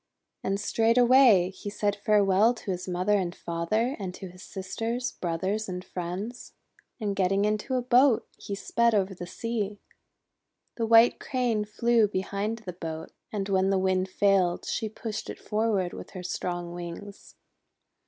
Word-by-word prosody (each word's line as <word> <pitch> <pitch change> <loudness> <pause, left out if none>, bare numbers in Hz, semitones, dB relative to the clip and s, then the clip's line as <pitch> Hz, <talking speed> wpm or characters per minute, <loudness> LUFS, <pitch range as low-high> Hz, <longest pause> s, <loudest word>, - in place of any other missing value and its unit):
And 195 +1 -1
straightway 230 -2 +5
he 205 - -7
said 205 0 -1
farewell 205 +2 +3
to 210 - -5
his 180 0 -4
mother 185 +3 +1
and 175 -2 -3
father, 215 +10 -1
and 185 -2 -5
to 190 - -8
his 180 +1 -14
sisters, 225 +6 -3
brothers, 190 +5 -2
and 180 0 -5
friends; 185 +7 -6 0.5
and 205 -3 -2
getting 195 +1 +2
into 215 +5 -1
a 250 - 0
boat, 250 0 +4
he 200 - -6
sped 235 +3 +1
over 195 -1 +1
the 175 -1 -8
sea. 210 -1 -3 1.0
The 230 -1 -1
White 230 +1 +6
Crane 240 -5 0
flew 230 +1 +2
behind 205 +3 -3
the 180 - -5
boat, 160 -2 -6 0.2
and 200 -2 -2
when 190 -1 +2
the 195 - +2
Wind 185 0 +1
failed, 190 -2 +2
she 220 -2 -2
pushed 220 0 -6
it - - -6
forward 210 -4 0
with - - -8
her 180 - -6
strong 175 -1 -3
wings. 175 +4 -9
200 Hz, 155 wpm, -27 LUFS, 185-225 Hz, 1.0 s, White